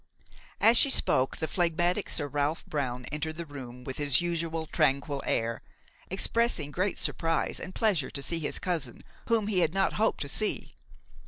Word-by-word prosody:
As 230 +1 +7
she 275 - +10
spoke 130 - +3
the 160 - -2
phlegmatic 175 0 0
Sir 145 - 0
Ralph 145 +2 -2
Brown 125 -4 -3
entered 155 +1 -4
the 170 +1 -6
room 125 -4 -10
with 130 +1 -6
his 145 -3 +3
usual 165 -2 -2
tranquil 140 -2 0
air, 115 0 -1 0.5
expressing 195 -5 0
great 185 +4 -1
surprise 165 0 -1
and 185 +1 -9
pleasure 200 - +1
to 140 - -3
see 170 +2 -2
his 150 - -2
cousin, 160 -10 -3 0.2
whom 230 -3 +2
he 205 -3 0
had 170 0 +1
not 195 0 +1
hoped 220 +1 0
to 140 - -2
see. 215 +9 0
160 Hz, 170 wpm, -28 LUFS, 140-180 Hz, 0.5 s, she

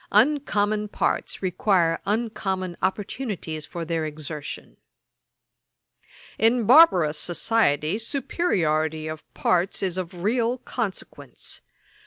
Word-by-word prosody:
Uncommon 210 -4 +2
parts 205 - -2
require 180 -2 +2
uncommon 195 -4 -2
opportunities 190 - -3
for 170 -1 -5
their 165 -1 -1
exertion. 150 -1 -7 1.6
'In 230 +1 +3
barbarous 185 - +6
society, 175 -2 +1
superiority 160 - -1
of 155 0 -8
parts 180 +2 +1
is 185 -1 -1
of 180 -1 -6
real 235 +3 +1
consequence. 230 -5 -6
190 Hz, 90 wpm, -24 LUFS, 160-225 Hz, 1.6 s, barbarous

